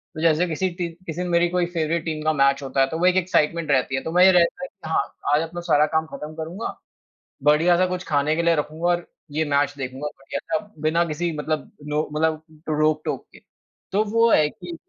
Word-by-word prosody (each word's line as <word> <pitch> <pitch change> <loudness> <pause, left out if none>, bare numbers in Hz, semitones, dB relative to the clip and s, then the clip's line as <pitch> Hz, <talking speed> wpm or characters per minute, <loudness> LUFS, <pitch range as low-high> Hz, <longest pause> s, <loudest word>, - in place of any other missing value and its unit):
तो 155 - -5
जैसे 165 +2 +3
किसी 175 +3 -1
ती 175 -1 -2 0.2
किसी 165 +2 -4
ने 180 - -2
मेरी 170 0 +3
कोई 180 0 +1
फ़ेवरेट 165 0 0
टीम 155 -2 -3
का 155 0 +2
मैच 140 -1 +3
होता 135 0 0
है 135 - +4
तो 160 - -3
वो 180 - +2
एक 185 0 +4
एक्साइटमेंट 170 -3 +1
रहती 130 0 +2
है। 130 - -1
तो 160 - -4
वही 180 +2 +7
रहता 175 +7 +2
है - - -3
कि 195 -9 -11
हाँ, 160 - -1 0.2
आज 150 - +4
अपनो 170 +2 -6
सारा 155 -3 +3
काम 160 0 +2
खत्म 150 +1 -7
करूँगा 165 +6 -5 0.7
बढ़िया-सा 170 +5 +4
कुछ 180 0 -3
खाने 150 +1 +1
के 170 - +1
लिए 170 0 +4
रखूँगा 155 +3 -2
और 175 0 0 0.3
ये 155 +2 0
मैच 145 -1 +1
देखूँगा 135 +2 -4
बढ़िया-सा 170 +9 -3 0.2
बिना 160 +2 +2
किसी 170 +2 -2
मतलब 150 0 -3 0.2
नो 150 +1 +1
मतलब 155 0 0 0.3
रोक-टोक 155 0 0
के। - - -14 0.5
तो 205 +2 +2
वो 230 +2 +3
है 150 - +5
कि 175 0 -9
160 Hz, 220 wpm, -23 LUFS, 150-175 Hz, 0.7 s, वही